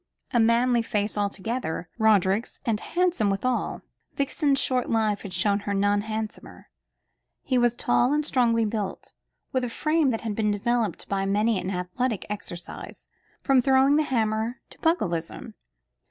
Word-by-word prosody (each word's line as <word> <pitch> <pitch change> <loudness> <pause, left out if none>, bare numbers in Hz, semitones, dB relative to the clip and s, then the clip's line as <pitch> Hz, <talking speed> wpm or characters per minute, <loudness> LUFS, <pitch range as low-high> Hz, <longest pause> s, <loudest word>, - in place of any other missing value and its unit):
A 240 - +4
manly 235 +1 +3
face 210 -2 -1
altogether, 205 -3 -2
Roderick's, 210 0 +2
and 225 -4 +1
handsome 345 - 0
withal. 240 +6 -1 0.3
Vixen's 280 +1 +1
short 255 -2 0
life 215 -3 +1
had 200 - -8
shown 200 +2 +1
her 200 0 -3
none 205 +1 +2
handsomer. 220 0 -6 0.7
He 255 -2 +1
was 240 -1 +2
tall 245 +1 +2
and 300 0 +1
strongly 230 -5 +2
built, 210 -2 -4 0.4
with 260 -1 0
a 245 - -1
frame 305 +4 +1
that 225 -3 -1
had 225 -3 -3
been 215 -1 +1
developed 215 -1 -1
by 195 -1 -1
many 210 +1 +2
an 185 - -4
athletic 190 +5 -2
exercise 190 -4 -7 0.3
from 270 -2 +4
throwing 265 +2 +4
the - - +4
hammer 225 -3 -1
to - - -13
pugilism. 220 - -1
225 Hz, 150 wpm, -26 LUFS, 205-255 Hz, 0.7 s, A